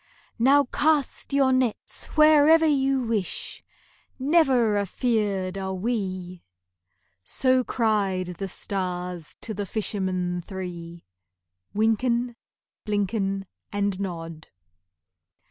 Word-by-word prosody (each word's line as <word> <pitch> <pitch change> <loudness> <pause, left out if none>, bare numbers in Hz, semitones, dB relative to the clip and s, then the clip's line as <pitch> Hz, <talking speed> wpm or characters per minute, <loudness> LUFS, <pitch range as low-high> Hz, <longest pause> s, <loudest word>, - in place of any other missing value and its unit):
"Now 275 +4 +5
cast 295 +2 0
your 275 -2 +3
nets 255 -4 -1
wherever 310 +1 +6
you 270 -3 +2
wish,— 220 -6 -3 0.5
Never 265 -6 +3
afeard 200 -2 -1
are 190 0 -3
we!" 185 -4 -3 0.8
So 255 - +2
cried 195 -7 0
the 195 - -2
stars 180 -3 -4
to 220 - -4
the 205 0 -4
fishermen 185 -4 -2
three, 175 -2 -7 0.7
Wynken, 235 +3 +1 0.5
Blynken, 200 -2 -1 0.3
And 200 -2 -1
Nod. 165 -4 -6
205 Hz, 90 wpm, -25 LUFS, 185-255 Hz, 0.8 s, wherever